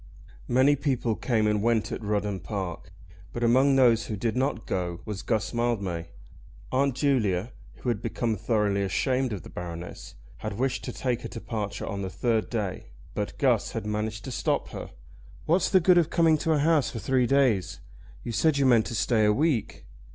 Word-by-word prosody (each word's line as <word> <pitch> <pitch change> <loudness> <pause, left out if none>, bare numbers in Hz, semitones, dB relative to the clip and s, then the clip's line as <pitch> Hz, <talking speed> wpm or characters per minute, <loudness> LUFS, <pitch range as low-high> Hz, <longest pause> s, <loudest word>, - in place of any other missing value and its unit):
Many 130 +4 +4
people 130 -5 0
came 110 -3 0
and 105 -1 +1
went 110 -2 +1
at - - -4
Rudham 105 -2 -1
Park, 95 -2 -5 0.4
but 120 - -4
among 130 +4 +4
those 120 -4 +4
who 110 - -3
did 115 +3 -1
not 130 -3 -1
go 90 -2 -3
was 105 -2 -5
Guss 110 -1 -1
Mildmay. 100 -8 -1 0.6
Aunt 135 0 +1
Julia, 115 -7 +1 0.2
who 125 - -4
had 115 -4 -1
become 115 -2 -1
thoroughly 105 -1 0
ashamed 125 +6 0
of 100 -4 -5
the - - -11
Baroness, 85 0 -7 0.2
had 105 -2 -5
wished 130 +1 -1
to 125 - -4
take 125 -1 -2
her - - -5
departure 110 -3 -5
on 100 -2 -4
the 95 - -3
third 110 +5 0
day; 105 - -3 0.3
but - - -4
Guss - - +2
had - - -4
managed 105 0 -3
to 130 - -6
stop - - -1
her. - - -7 0.6
"What's 170 +3 +2
the 190 - +5
good 180 0 +5
of 165 -2 +1
coming 165 -2 +4
to 160 - +1
a - - +2
house 150 -1 +3
for - - -7
three 125 +3 +1
days? 130 -9 +2 0.4
You 120 - -4
said 155 +5 +2
you 140 - +2
meant 120 -4 +4
to 120 - -4
stay 110 0 +2
a 105 - +5
week. 140 0 0
115 Hz, 190 wpm, -27 LUFS, 105-130 Hz, 0.6 s, the